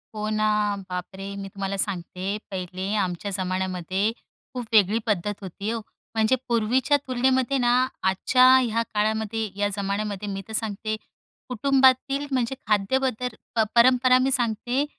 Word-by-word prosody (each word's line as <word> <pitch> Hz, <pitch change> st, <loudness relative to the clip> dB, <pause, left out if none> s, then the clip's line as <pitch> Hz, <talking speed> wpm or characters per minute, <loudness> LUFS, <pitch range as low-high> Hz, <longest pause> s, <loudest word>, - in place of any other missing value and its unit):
हो 215 Hz, 0 st, -2 dB
ना, 215 Hz, 0 st, +1 dB, 0.4 s
बापरे! 190 Hz, +2 st, -6 dB
मी 200 Hz, 0 st, -6 dB
तुम्हाला 195 Hz, 0 st, -4 dB
सांगते, 190 Hz, +1 st, -3 dB
पहिले 185 Hz, +1 st, -4 dB
आमच्या 180 Hz, +3 st, -4 dB
जमान्यामध्ये 185 Hz, +2 st, -1 dB, 0.4 s
खूप 245 Hz, -2 st, -4 dB
वेगळी 210 Hz, 0 st, +5 dB
पद्धत 205 Hz, -1 st, 0 dB
होती 200 Hz, +2 st, -5 dB
हो. 230 Hz, -, -2 dB, 0.4 s
म्हणजे 220 Hz, +3 st, +3 dB
पूर्वीच्या 240 Hz, +5 st, +2 dB
तुलनेमध्ये 260 Hz, +1 st, +1 dB
ना, 240 Hz, -2 st, +2 dB, 0.3 s
आजच्या 190 Hz, +7 st, +3 dB
ह्या 230 Hz, -3 st, +1 dB
काळामध्ये, 220 Hz, +1 st, -1 dB
या 205 Hz, -, +2 dB
जमान्यामध्ये, 200 Hz, 0 st, -2 dB
मी 195 Hz, 0 st, -4 dB
तर 220 Hz, -, -9 dB
सांगते 215 Hz, 0 st, -2 dB, 0.5 s
कुटुंबातील 270 Hz, +2 st, +3 dB
म्हणजे 255 Hz, -1 st, 0 dB
खाद्य 210 Hz, +4 st, +2 dB
बदल 250 Hz, -2 st, -1 dB, 0.3 s
प 225 Hz, -, +4 dB
परंपरा 255 Hz, +1 st, +6 dB
मी 265 Hz, +1 st, +1 dB
सांगते 245 Hz, +2 st, 0 dB
215 Hz, 135 wpm, -25 LUFS, 195-250 Hz, 0.5 s, परंपरा